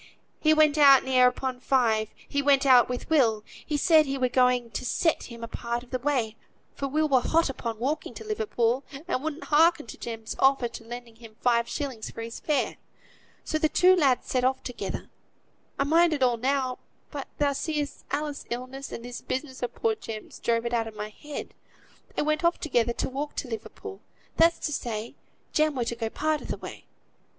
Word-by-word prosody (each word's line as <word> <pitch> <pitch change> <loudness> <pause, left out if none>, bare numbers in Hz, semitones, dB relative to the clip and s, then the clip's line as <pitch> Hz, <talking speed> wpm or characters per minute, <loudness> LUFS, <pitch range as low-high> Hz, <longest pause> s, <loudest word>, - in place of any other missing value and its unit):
he 310 - +4
went 310 -1 +4
out 275 -2 +8
near 255 -1 +5
upon 250 0 -2
five; 230 -5 +2 0.2
he 285 - 0
went 280 -1 +4
out 255 -3 +6
with 250 0 -4
Will; 230 -9 +3 0.2
he 300 - -2
said 310 0 +5
he 275 0 -2
were 255 -1 +2
going 250 -2 +2
to - - -4
set 320 +6 +1
him 235 -1 -10
a - - -4
part 235 +1 -4
of 245 - -19
the 255 - -1
way, 245 -5 0 0.4
for 275 - -3
Will 305 +3 +1
were 265 -4 +4
hot 325 0 +2
upon 230 -3 -5
walking 270 +7 -2
to - - -8
Liverpool, 285 - 0 0.2
and 285 -7 -1
wouldn't 315 0 -4
hearken 325 +1 +4
to - - -10
Jem's 225 -2 -6
offer 270 -2 +4
of 230 0 -6
lending 235 0 -9
him 225 -2 -13
five 235 -1 +2
shilling 265 -6 -4
for 225 +1 -6
his 230 0 -7
fare. 300 -2 0 0.7
So 310 - -1
the 310 - +2
two 365 +4 +5
lads 275 -8 +2
set 255 -1 0
off 260 +1 +1
together. 250 - -5 0.7
I - - +2
mind 330 +3 +4
it 285 -3 0
all 245 -2 +3
now; 260 +1 0 0.3
but, 280 -3 -5
thou 285 -1 +2
seest, 295 0 -3
Alice's 295 0 -3
illness, 255 +3 -5
and 230 - -7
this 245 0 -7
business 265 -1 -4
of 245 - -3
poor 450 -1 +1
Jem's, 225 - -8
drove 230 0 0
it 235 - -2
out 230 -1 +1
of 220 - -9
my 210 0 -5
head; 295 +7 -8 0.6
they - - +1
went 305 +2 0
off 340 +1 +2
together, 240 -6 +1
to - - -2
walk 280 +3 -4
to - - -3
Liverpool; 320 - -7 0.3
that's 335 +1 +5
to 300 - -1
say, 230 -3 -4 0.4
Jem 310 -1 +2
were 245 -2 -1
to 235 - -2
go 230 -1 -2
a - - -4
part 310 +4 -1
o' - - -9
th' - - -4
way. - - -9
260 Hz, 210 wpm, -27 LUFS, 235-300 Hz, 0.7 s, out